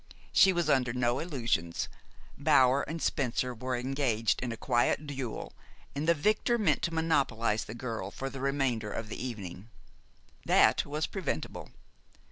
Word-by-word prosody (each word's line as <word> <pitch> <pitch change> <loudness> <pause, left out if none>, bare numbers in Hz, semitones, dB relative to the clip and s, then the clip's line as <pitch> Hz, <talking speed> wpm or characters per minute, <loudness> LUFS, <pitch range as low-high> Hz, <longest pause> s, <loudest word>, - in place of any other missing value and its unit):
She 190 - +6
was 175 -3 0
under 125 -5 +2
no 125 0 +1
illusions. 115 - -1 0.5
Bower 140 -2 +4
and 165 +1 -4
Spencer 125 -4 0
were 125 +2 -3
engaged 125 -3 0
in 125 -1 -2
a 115 - -5
quiet 120 +5 +1
duel, 135 -5 -5 0.4
and 145 +3 -2
the 170 - +5
victor 215 +9 +2
meant 175 - +2
to 170 - -1
monopolize 135 -9 +1
the 110 - -8
girl 115 -5 -4
for 135 +6 -5
the 135 -1 -6
remainder 135 -6 0
of 110 - -5
the 115 - -5
evening. 105 -4 -6 0.7
That - - +4
was 150 +2 -1
preventable. 160 - -4
130 Hz, 150 wpm, -30 LUFS, 115-145 Hz, 0.7 s, She